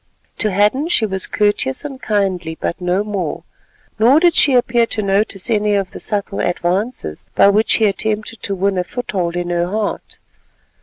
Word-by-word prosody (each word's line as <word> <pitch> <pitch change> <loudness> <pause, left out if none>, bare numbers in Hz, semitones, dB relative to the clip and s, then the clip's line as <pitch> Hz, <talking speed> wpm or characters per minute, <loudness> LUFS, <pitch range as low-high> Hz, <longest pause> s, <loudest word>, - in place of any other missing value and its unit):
To 215 - +1
Hadden 210 - +2
she 235 -10 +2
was 190 -2 -2
courteous 205 - 0
and 275 -2 -7
kindly 185 -6 -1
but 170 - -3
no 180 +3 0
more, 205 -3 -4 0.6
nor 250 +7 +6
did 345 0 +4
she 280 -4 +4
appear 240 -1 +2
to 215 - -2
notice 195 0 0
any 210 -2 +1
of 195 -2 -1
the - - -9
subtle 200 -1 -3
advances 175 - -2
by 200 - +6
which 210 +2 +3
he 220 - +2
attempted 215 +2 -1
to 200 - -2
win 195 0 0
a - - 0
foothold 180 -5 -3
in 175 0 -2
her 175 0 0
heart. 210 +2 -4
205 Hz, 175 wpm, -18 LUFS, 185-220 Hz, 0.6 s, nor